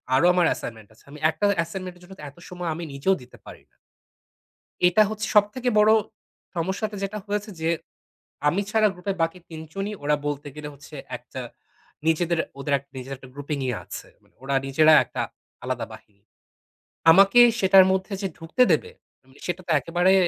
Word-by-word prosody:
আরও 135 - +4
আমার 180 -1 +3
assignment 110 -3 -8
আছে। 110 - -23
আমি 150 - -10
একটা 205 - -1 0.2
assignment 185 +1 -7
এর - - -21
জন্য 185 +2 -12
তো - - -10
এত 140 - -21
সময় 180 -1 -4
আমি 170 - -6
নিজেও 165 +8 +2
দিতে 125 - -16
পারি - - -12
না। - - -38 1.1
এটা 180 +4 +4
হচ্ছে 215 0 -3
সবথেকে 210 +5 +3
বড় 210 +1 +6 0.6
সমস্যাটা 190 +5 -2
যেটা 195 +2 -3
হয়েছে 210 +1 -2
যে 160 - +1 0.8
আমি 185 +7 +1
ছাড়া 215 -1 +4
গ্রুপের 195 +2 -4
বাকি 165 +2 -1
৩ 160 -1 -7
জনই 195 +2 -3
ওরা 150 +1 +2
বলতে 145 0 -3
গেলে 150 -1 -6
হচ্ছে 145 +2 -14 0.2
একটা - - -9 0.7
নিজেদের 165 +1 +2 0.2
ওদের 140 +1 -3
এক 135 - -19
নিজের 130 +1 -7
একটা 130 0 -14
গ্রুপিং 145 +1 -4
ই 125 - 0
আছে। - - -9
মানে - - -30
ওরা 135 +1 -2
নিজেরা 155 +3 +5
একটা - - -4 0.4
আলাদা - - -2
বাহিনী। 100 -1 -16 0.9
আমাকে 195 +6 +6 0.2
সেটার 190 -1 +7
মধ্যে 190 +2 -1
যে 195 - -1
ঢুকতে 165 +10 +2
দেবে, 155 - +1 0.3
মানে 130 +1 -22
সেটা 180 +1 -3
তো - - -1
একেবারে 175 +6 +2
175 Hz, 180 wpm, -24 LUFS, 145-195 Hz, 1.1 s, সেটার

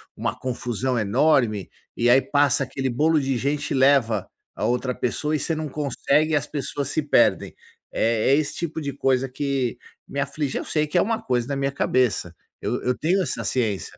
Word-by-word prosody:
uma - - -3
confusão 125 0 -2
enorme, 115 - +2 0.3
e 120 +1 +2
aí 130 +2 +6
passa 140 -1 +2
aquele 135 +1 -3
bolo 155 +6 +2
de 135 -2 -1
gente 140 +4 -2
e - - +2
leva 130 -7 +3 0.3
a - - -2
outra 125 +1 0
pessoa 150 +5 -2
e 150 - -1
você 165 - -1
não 155 -1 -4
consegue 150 +2 0
e - - +4
as 145 -4 +1
pessoas 145 -1 -3
se - - 0
perdem. 145 - +2 0.4
É 115 +4 +2
esse 150 -1 -1
tipo 160 -1 -4
de 140 -2 -3
coisa 135 -1 +1
que 130 -2 -2 0.3
me 140 - -5
aflige, 140 0 -2
eu - - -4
sei 150 -1 0
que 150 - -1
é - - +5
uma 225 +1 -1
coisa 125 -2 -1
na 140 - -2
minha 135 0 -1
cabeça, 125 -10 0 0.3
eu - - -2
eu 125 0 0
tenho 180 +5 +1
essa - - -3
ciência, 110 -7 -2
135 Hz, 200 wpm, -23 LUFS, 125-150 Hz, 0.4 s, aí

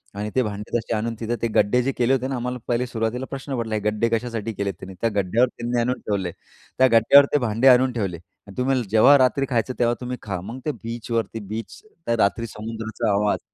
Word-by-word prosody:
आणि 105 +1 -3
ते 130 - +3
भांडे 105 +1 -5
तसे 115 0 -4
आणून 115 +2 -2
तिथं 115 +1 -2
ते 115 - +1
गड्डे 105 +5 +3
जे 135 - 0
केले 125 +2 +2
होते 130 0 0
ना 135 - -3
आम्हाला 125 +1 -3
पहिले 120 +1 0
सुरुवातीला 120 +2 -2
प्रश्न 135 -1 -4
पडला 110 -2 -2
गड्डे 105 +2 +1
कशासाठी 115 -1 -2
केले 100 0 -2
त्यांनी? 95 -1 -11
त्या 115 - +2
गड्ड्यावर 105 +6 +2
त्यांनी 120 0 -3
आणून 125 +1 -1
ठेवले. 95 -4 -1 0.5
त्या 130 - +6
गड्ड्यावर 130 +5 +7
ते - - +5
भांडे 120 +2 +1
आणून 130 0 +6
ठेवले 95 -7 -2
आणि 100 +4 -18
तुम्हाला 130 -1 +1
जेव्हा 125 +7 +6
रात्री 130 +1 +2
खायचं 120 +1 0
तेव्हा 120 0 +2
तुम्ही 125 0 -4
खा. 95 -4 -4
मग 115 +7 -7
ते 150 - +1
बीचवरती 115 -1 -3
बीचचा 110 - -7 0.2
त्या 115 - +1
रात्री 115 +3 -2
समुद्राचा 110 0 -4
आवाज. 105 +1 +1
115 Hz, 215 wpm, -23 LUFS, 110-125 Hz, 0.5 s, गड्ड्यावर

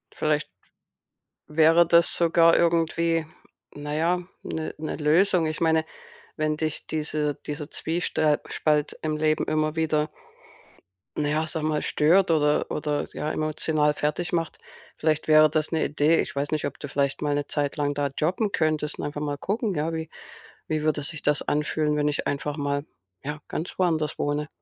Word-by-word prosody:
Vielleicht 150 -4 0 1.0
wäre 160 +2 +5
das 170 0 +5
sogar 165 0 +4
irgendwie, 165 -1 +2 0.5
na 145 0 -6
ja, 170 +3 +2 0.2
'ne 160 0 -4
'ne 155 0 -4
Lösung. 165 +3 +3
Ich 155 +1 -3
meine, 160 -1 +3 0.5
wenn 155 -1 0
dich 155 -1 -3
diese 150 -1 -1
dieser 150 0 -5
Zwiestr 160 -2 0
Spalt 150 -1 0
im 155 -1 -1
Leben 155 0 +1
immer 155 0 0
wieder 155 -1 +1 1.1
na 145 -1 0
ja, 155 +1 +1
ich 160 - -5
sage 160 -2 -2
mal 150 -1 0
stört 170 +4 +3
oder 150 -2 +2
oder 150 -1 -1
ja, 155 - -3
emotional 155 -1 +1
fertigmacht. 165 +2 -2 0.4
Vielleicht 155 -1 0
wäre 155 0 +7
das 155 +1 -1
'ne 160 - +1
Idee. 150 +2 +2
Ich - - -6
weiß 140 +1 -1
nicht, 155 -1 -1
ob 145 - -5
du 145 - -5
vielleicht 140 0 -1
mal 145 -1 0
'ne 145 0 -1
Zeit 145 -1 -2
lang 145 -1 0
da 145 0 -1
jobben 185 +7 0
könntest 155 -2 0
und - - -4
einfach 145 0 -4
mal 145 -1 -2
gucken, 205 - -2
ja, 155 +2 -1
wie 160 -1 -4 0.6
wie 155 -1 -1
würde 150 -1 0
sich 155 0 -5
das 150 0 +1
anfühlen, 150 0 0
wenn 150 0 +1
ich 145 - -1
einfach 145 +1 -2
mal, 145 0 -1 0.4
ja, 150 +1 -5
ganz 165 - -5
woanders 160 -5 0
wohne. 145 +1 -1
155 Hz, 170 wpm, -25 LUFS, 150-160 Hz, 1.1 s, wäre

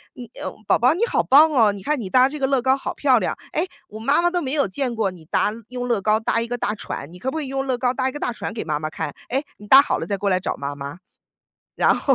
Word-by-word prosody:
嗯 250 - -8
哎， 220 - -13 0.3
宝 - - +4
宝 250 +6 +4
你 430 +7 +1
好 - - +1
棒 305 +4 +6
哦！ 225 -7 +4
你 195 - -9
看 300 -2 0
你 195 -5 -5
搭 255 +3 +5
这 300 0 -6
个 265 - +1
乐 270 -2 +2
高 260 +2 +3
好 - - -4
漂 260 -5 +3
亮。 - - -1 0.2
哎， 330 +4 0 0.4
妈 295 +4 +4
妈 350 - +3
都 355 -1 0
没 270 -1 -3
有 285 -2 +2
见 250 +5 -3
过 215 -3 +1
你 170 -3 -14
搭 205 - +1 0.2
用 245 -1 -4
乐 235 -4 +1
高 215 +2 +2
搭 230 0 0
一 230 - -3
个 245 - -2
大 210 -2 -1
船。 155 -7 -6
你 180 - -11
可 265 +5 -2
不 315 - -4
可 - - -1
以 - - -6
用 270 0 -2
乐 255 -2 0
高 250 -1 +2
搭 260 -1 0
一 - - -6
个 295 - -7
大 245 - -1
船 220 - -5
给 225 - -4
妈 150 -2 -1
妈 155 - -3
看？ 155 -3 -4 0.2
哎， 270 +4 0
你 210 - -13
搭 270 +4 +9
好 - - -1
了 165 - -4
再 200 - -2
过 200 +1 -1
来 185 - +2
找 - - -3
妈 140 0 -4
妈。” 140 +4 -7 0.8
然 - - +4
后 275 - +2
245 Hz, 330 characters per minute, -22 LUFS, 200-275 Hz, 0.8 s, 搭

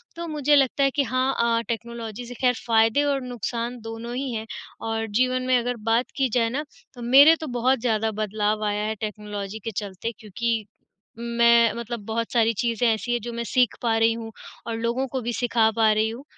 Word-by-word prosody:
तो 340 0 -5
मुझे 295 -2 +2
लगता 275 0 +3
है 275 - +3
कि 285 - +3
हाँ 255 +2 0 0.3
अ, - - -2
टेक्नोलॉजी 235 0 -5
से 245 - -7
खैर 250 -1 +4
फायदे 225 +4 +4
और 280 -2 0
नुकसान 240 0 -4
दोनों 225 +2 -6
ही 265 0 -3
हैं 220 0 -4 0.4
और 225 0 -2
जीवन 255 0 +1
में 255 - +4
अगर 245 +1 -1 0.2
बात 235 +3 +1
की 270 -2 +2
जाए 230 0 +1
ना 280 +5 -2 0.3
तो 245 - -11
मेरे 275 +7 +7
तो 315 - -4
बहुत 260 +2 +2
ज़्यादा 225 -2 0
बदलाव 215 0 -1
आया 210 0 -1
है 220 - -2
टेक्नोलॉजी 210 -1 -5
के 225 - -3
चलते 200 +2 -4
क्योंकि 225 +1 -2 0.5
मैं 235 -1 +4
मतलब 235 0 -5
बहुत 230 +1 -2
सारी 230 -1 +3
चीज़ें 235 +1 0
ऐसी 230 +2 -4
हैं, 240 - +1
जो 240 - -5
मैं 235 - -3
सीख 250 -3 +3
पा 230 -2 +1
रही 225 0 +4
हूँ 225 -1 -7 0.4
और 230 - -2
लोगों 235 +3 -1
को 260 -2 -2
भी 240 +1 -3
सिखा 230 -2 +2
पा 220 -1 +5
रही 215 +1 +1
हूँ। 240 +5 -8
235 Hz, 210 wpm, -24 LUFS, 225-250 Hz, 0.5 s, मेरे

